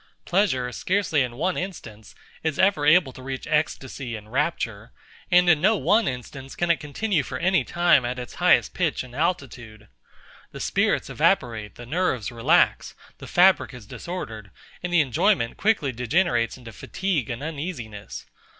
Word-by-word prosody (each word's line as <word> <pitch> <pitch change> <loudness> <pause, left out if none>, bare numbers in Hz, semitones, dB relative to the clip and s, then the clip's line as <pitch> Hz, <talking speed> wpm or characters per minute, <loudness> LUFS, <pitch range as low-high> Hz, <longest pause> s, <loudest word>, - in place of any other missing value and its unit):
Pleasure, 175 -10 +1
scarcely 180 - 0
in 125 -2 -2
one 180 +8 -1
instance, 115 - -7 0.3
is 160 -3 -2
ever 190 -6 +2
able 155 -4 +5
to 130 - -12
reach 130 0 -6
ecstasy 140 -5 -2
and 105 0 -11
rapture; 125 -6 -2 0.4
and 180 0 +5
in 160 -4 +5
no 215 +4 +4
one 220 +2 +2
instance 130 +2 -6
can 175 0 +1
it 165 - +1
continue 160 +4 -1
for 130 - -6
any 180 -1 +2
time 175 -2 +3
at 125 +1 -3
its 125 -1 -7
highest - - +4
pitch - - -1
and 125 -1 -13
altitude. 125 -9 -3 0.6
The - - -8
spirits - - 0
evaporate, 110 -4 0
the 120 - -10
nerves 130 - -1
relax, 115 -1 +2 0.2
the - - -9
fabric 175 -7 +4
is 120 -4 -11
disordered, 110 - -7 0.3
and 180 - -4
the 175 -2 +5
enjoyment 135 - +1
quickly 200 -10 +1
degenerates 125 -1 0
into 115 -3 -11
fatigue 165 - -2
and 120 +3 -5
uneasiness. 145 - -6
140 Hz, 160 wpm, -24 LUFS, 120-175 Hz, 0.6 s, able